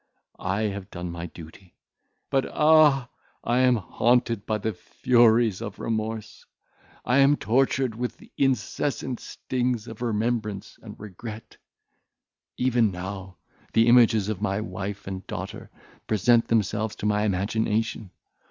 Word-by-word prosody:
I 100 +4 0
have 100 -2 -3
done 90 -2 -6
my 85 0 -6
duty; 85 +2 -14 0.6
but 135 -1 +1
ah! 150 -5 +5 0.3
I 120 +2 +1
am 130 -1 +5
haunted 115 +1 +1
by 110 - +1
the 110 +1 -2
furies 115 +1 +3
of 100 - -6
remorse; 110 -1 -4 0.6
I 125 +3 +3
am 140 +1 +6
tortured 130 0 +1
with 120 +2 -4
the - - -18
incessant 130 0 -1
stings 125 -3 -3
of 115 0 -9
remembrance 110 -3 -2
and - - -11
regret; 105 +2 -9 1.0
even 125 -3 +2
now 95 0 -7 0.4
the 115 0 +5
images 115 -4 +5
of 105 -3 -3
my 100 -1 0
wife 100 -2 -5
and 95 -1 -6
daughter - - -6 0.4
present 115 +2 +3
themselves 110 -1 0
to - - -6
my 105 0 +2
imagination. 105 +1 -1
110 Hz, 130 wpm, -25 LUFS, 100-120 Hz, 1.0 s, am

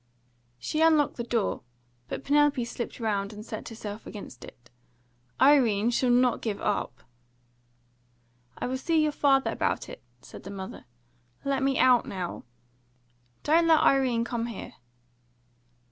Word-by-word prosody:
She 305 - -2
unlocked 315 -3 +3
the 235 - -3
door, 230 -3 -1 0.5
but - - -5
Penelope 290 -3 +3
slipped 235 +1 -6
round 205 -3 -1
and 210 0 -10
set - - -7
herself 215 -1 -8
against 135 - -9
it. 120 0 -15 0.7
"Irene 240 -6 +4
shall 250 +1 +1
not 245 0 +3
give 215 -3 -3
up!" 205 - -2 1.5
"I - - -3
will 260 +1 -2
see 325 +4 +1
your 305 - +1
father 275 -2 +2
about - - -2
it," - - -10 0.2
said - - -12
the 195 - -10
mother. 190 -8 -8 0.6
"Let 275 -1 0
me 270 0 +1
out 250 -2 +4
now 180 -8 -5 0.5
" 120 -1 -40
"Don't 330 +2 +3
let 320 -2 +5
Irene 255 -4 +3
come 235 -1 -3
here!" 230 -4 -8
235 Hz, 145 wpm, -27 LUFS, 205-275 Hz, 1.5 s, let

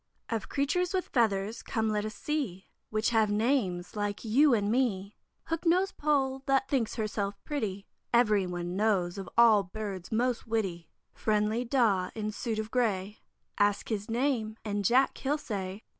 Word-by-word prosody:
OF 225 -3 -3
Creatures 360 +7 0
with 370 - -1
Feathers, 215 -3 +1
come 220 -1 -1
let 210 -1 0
us 215 -1 -5
see 265 -12 -3 0.2
Which 215 +2 0
have 220 -2 +3
names 205 -5 0
like 205 +1 -3
you 275 +7 +5
and 210 -3 +2
me. 210 -6 0 0.3
Hook 330 0 -3
nosed 365 +3 +2
Poll, 270 -3 +1
that 270 -1 +2
thinks 260 -5 0
herself 205 -2 -2
pretty, 205 -9 -3 0.3
Everyone 185 -7 +2
knows, 195 -3 +1
of 190 - -7
all 230 -3 +7
birds 195 -1 -6
most 240 +1 0
witty. 190 -7 -2 0.2
Friendly 215 +2 0
Daw, 225 -8 +2
in 215 -1 -2
suit 220 +1 -3
of 220 0 -4
gray, 210 -5 0 0.4
Ask 205 +2 +1
him - - +3
his 205 +2 -12
name, 230 -3 0
and 205 -1 -1
'Jack!' 255 +7 +3
he'll 285 +3 0
say. 200 -6 -5
220 Hz, 160 wpm, -29 LUFS, 200-250 Hz, 0.4 s, all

